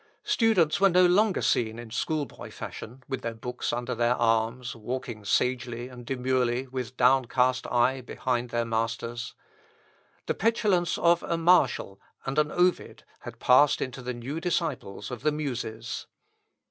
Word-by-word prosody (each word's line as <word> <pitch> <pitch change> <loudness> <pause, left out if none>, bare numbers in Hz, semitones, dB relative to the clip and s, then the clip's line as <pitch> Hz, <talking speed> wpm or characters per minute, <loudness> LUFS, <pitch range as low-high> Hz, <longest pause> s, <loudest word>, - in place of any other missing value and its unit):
Students 195 -8 +2
were 195 - +7
no 180 0 +5
longer 195 +3 +3
seen 110 -1 +1
in 120 -1 -9
schoolboy 150 +4 -3
fashion, 125 +4 -9
with 130 -2 -4
their 115 -1 -4
books 125 +2 -4
under 120 +1 -2
their 120 +1 +2
arms, 115 +1 0
walking 120 -1 -5
sagely 120 +2 -1
and 125 -1 -11
demurely 130 -1 0
with 130 -1 -6
downcast 130 0 +3
eye 125 +2 +2
behind 125 0 -2
their 120 0 -1
masters. 115 +1 -3 0.9
The - - 0
petulance 210 -6 +1
of 170 0 +3
a 170 - -2
Martial 145 - +2 0.2
and 135 +3 0
an 150 0 +2
Ovid 180 0 0 0.2
had - - -9
passed 135 +3 +5
into 130 0 -4
the 125 0 -4
new 130 +7 -5
disciples 155 - -3
of 125 - -6
the 150 - +2
Muses. 120 -6 -4
125 Hz, 145 wpm, -27 LUFS, 120-150 Hz, 0.9 s, were